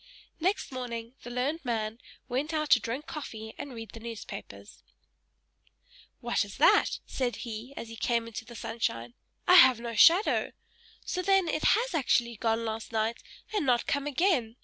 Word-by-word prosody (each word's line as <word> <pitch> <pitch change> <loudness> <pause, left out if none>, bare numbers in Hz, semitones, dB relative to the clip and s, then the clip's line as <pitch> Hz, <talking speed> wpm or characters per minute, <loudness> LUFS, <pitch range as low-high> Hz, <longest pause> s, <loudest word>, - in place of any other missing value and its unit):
Next 375 +1 0
morning, 235 -2 -5
the 240 - -8
learned 270 +7 -2
man 225 -2 -2 0.3
went 290 +6 -2
out 305 -1 -1
to - - +8
drink 255 +6 -4
coffee 220 -7 -7
and 285 - -6
read 225 -2 -8
the 230 - -10
newspapers. 230 -1 -9 1.4
"What - - +1
is - - -10
that?" - - +4
said 245 -4 -2
he, 235 +4 -7
as 230 - -6
he 230 - -8
came 235 +1 0
out 230 - -9
into 225 0 -7
the 235 +1 -12
sunshine. 120 - -3 0.3
"I 360 - +6
have 260 -5 +8
no 235 0 -5
shadow! 335 - +5 0.5
So 365 - -2
then, 385 -1 +3
it 310 - -1
has - - -2
actually 240 -6 +1
gone 225 +1 0
last 220 +1 -4
night, 225 +1 -1 0.3
and 415 - +1
not 245 -3 +2
come 285 0 -1
again. 280 - +1
240 Hz, 170 wpm, -29 LUFS, 225-295 Hz, 1.4 s, to